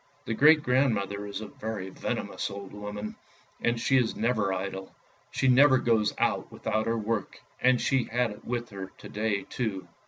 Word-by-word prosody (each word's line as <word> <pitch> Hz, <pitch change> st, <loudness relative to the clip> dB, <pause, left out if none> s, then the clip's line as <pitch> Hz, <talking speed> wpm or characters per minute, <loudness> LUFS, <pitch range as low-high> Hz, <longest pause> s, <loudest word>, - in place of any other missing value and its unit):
The 115 Hz, -, -1 dB
great 150 Hz, +5 st, +6 dB
grandmother 105 Hz, -7 st, +1 dB
is 100 Hz, -, -5 dB
a 110 Hz, -, -6 dB
very 105 Hz, -3 st, -5 dB
venomous -, -, -3 dB
old 100 Hz, -1 st, -8 dB
woman, 105 Hz, +1 st, -6 dB, 0.5 s
and 120 Hz, 0 st, +1 dB
she 135 Hz, -, +3 dB
is 120 Hz, -3 st, +1 dB
never 110 Hz, -4 st, +1 dB
idle. 95 Hz, 0 st, -4 dB, 0.3 s
She 130 Hz, -, 0 dB
never 130 Hz, +1 st, +7 dB
goes 110 Hz, -4 st, +2 dB
out -, -, 0 dB
without 110 Hz, 0 st, -1 dB
her 115 Hz, 0 st, +1 dB
work, 110 Hz, -2 st, -2 dB, 0.2 s
and 125 Hz, -1 st, +4 dB
she 135 Hz, -3 st, +2 dB
had 120 Hz, -1 st, 0 dB
it 105 Hz, -, -11 dB
with 120 Hz, -1 st, -3 dB
her 95 Hz, -1 st, -6 dB
to -, -, -11 dB
day 105 Hz, -2 st, -1 dB
too. 105 Hz, -6 st, -3 dB
110 Hz, 180 wpm, -28 LUFS, 100-125 Hz, 0.5 s, never